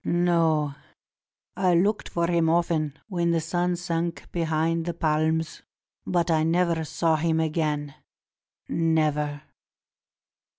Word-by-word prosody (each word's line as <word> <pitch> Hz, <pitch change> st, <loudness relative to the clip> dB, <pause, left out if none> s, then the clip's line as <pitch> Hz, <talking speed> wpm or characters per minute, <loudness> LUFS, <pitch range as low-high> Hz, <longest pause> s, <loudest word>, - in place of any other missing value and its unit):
No; 165 Hz, -4 st, +2 dB, 0.8 s
I 185 Hz, -2 st, +2 dB
looked 200 Hz, +5 st, +1 dB
for 170 Hz, 0 st, 0 dB
him 170 Hz, -1 st, +2 dB
often 160 Hz, -3 st, 0 dB
when 175 Hz, -4 st, 0 dB
the 170 Hz, -1 st, +2 dB
sun 175 Hz, +2 st, -1 dB
sank 170 Hz, -1 st, -3 dB
behind 165 Hz, 0 st, 0 dB
the 170 Hz, -, -2 dB
palms, 160 Hz, 0 st, 0 dB, 0.5 s
but 175 Hz, -1 st, +1 dB
I 160 Hz, -1 st, +3 dB
never 170 Hz, 0 st, +1 dB
saw 160 Hz, +1 st, +1 dB
him 160 Hz, +1 st, +1 dB
again 150 Hz, -3 st, -1 dB, 0.5 s
— -, -, -55 dB
never." 150 Hz, -3 st, 0 dB
165 Hz, 120 wpm, -25 LUFS, 155-170 Hz, 0.8 s, I